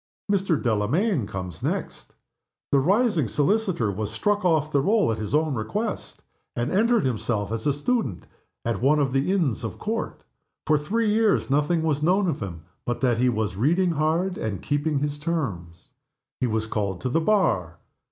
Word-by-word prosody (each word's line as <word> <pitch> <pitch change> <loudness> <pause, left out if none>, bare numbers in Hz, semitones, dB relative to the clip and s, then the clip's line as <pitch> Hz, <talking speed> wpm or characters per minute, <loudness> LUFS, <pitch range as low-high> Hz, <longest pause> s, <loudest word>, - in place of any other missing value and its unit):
Mr. 190 -6 +1
Delamayn 120 - +1
comes 90 -4 -6
next. - - -4 0.6
The 140 - +5
rising 190 - +2
solicitor 165 - +1
was 105 +1 -3
struck 205 - 0
off 155 -4 +2
the 140 - +3
roll, 205 - +3
at 110 - -3
his 110 +4 -2
own 155 -1 +2
request 205 - -4 0.3
and 120 +4 -1
entered 225 - +3
himself 110 -4 -1
as 115 +4 -2
a 145 - +3
student 145 - -1 0.4
at 115 -1 -1
one 145 +4 +4
of 140 -3 +1
the 135 +7 +1
Inns 165 - 0
of 110 - -5
Court. 225 +2 -4 0.4
For 150 -1 +3
three 215 +8 0
years 215 -9 +2
nothing 150 +4 +2
was 150 -3 0
known 185 +5 +3
of 155 -5 -1
him 85 -6 -6 0.2
but 120 - -3
that 120 -3 +2
he 125 +1 +3
was 110 -4 -1
reading 170 - +2
hard 165 +4 0
and 100 -4 -3
keeping 145 0 0
his 145 +1 -2
terms. 105 - -4 0.5
He 125 - +1
was 110 -1 -1
called 100 -4 -2
to 130 - -1
the 165 +6 +1
Bar. 130 - +1
145 Hz, 175 wpm, -25 LUFS, 110-180 Hz, 0.6 s, The